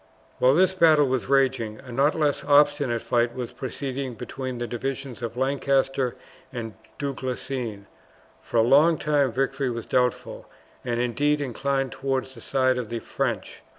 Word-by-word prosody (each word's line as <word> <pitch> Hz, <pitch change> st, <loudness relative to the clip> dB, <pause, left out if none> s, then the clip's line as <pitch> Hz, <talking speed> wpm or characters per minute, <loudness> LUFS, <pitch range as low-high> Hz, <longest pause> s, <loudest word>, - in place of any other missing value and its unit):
While 130 Hz, +2 st, +5 dB
this 185 Hz, +2 st, +4 dB
battle 160 Hz, -5 st, +5 dB
was 130 Hz, -2 st, -1 dB
raging, 130 Hz, -5 st, +1 dB
a 130 Hz, -, -11 dB
not 140 Hz, +5 st, +2 dB
less 150 Hz, -3 st, 0 dB
obstinate 145 Hz, -4 st, +3 dB
fight 120 Hz, 0 st, +1 dB
was 125 Hz, -1 st, -5 dB
proceeding 130 Hz, 0 st, -4 dB
between 130 Hz, +2 st, -5 dB
the 120 Hz, -, -3 dB
divisions 130 Hz, +1 st, -5 dB
of 115 Hz, 0 st, -5 dB
Lancaster 135 Hz, -1 st, +1 dB, 0.4 s
and 115 Hz, -4 st, -5 dB, 0.2 s
Du 140 Hz, -1 st, -2 dB
Guesclin. 125 Hz, -5 st, -4 dB, 0.6 s
For -, -, -3 dB
a 115 Hz, -, +6 dB
long 150 Hz, +7 st, +5 dB
time 145 Hz, -4 st, +1 dB
victory 135 Hz, +2 st, -1 dB
was 115 Hz, -1 st, -4 dB
doubtful, 125 Hz, -1 st, -1 dB, 0.3 s
and 120 Hz, -2 st, -2 dB
indeed 145 Hz, +5 st, +1 dB
inclined 135 Hz, 0 st, -1 dB
towards 135 Hz, -1 st, -2 dB
the 115 Hz, -, -13 dB
side 130 Hz, 0 st, +1 dB
of 115 Hz, -4 st, -5 dB
the 115 Hz, -, -3 dB
French. 115 Hz, -, -3 dB
130 Hz, 155 wpm, -25 LUFS, 120-140 Hz, 0.6 s, a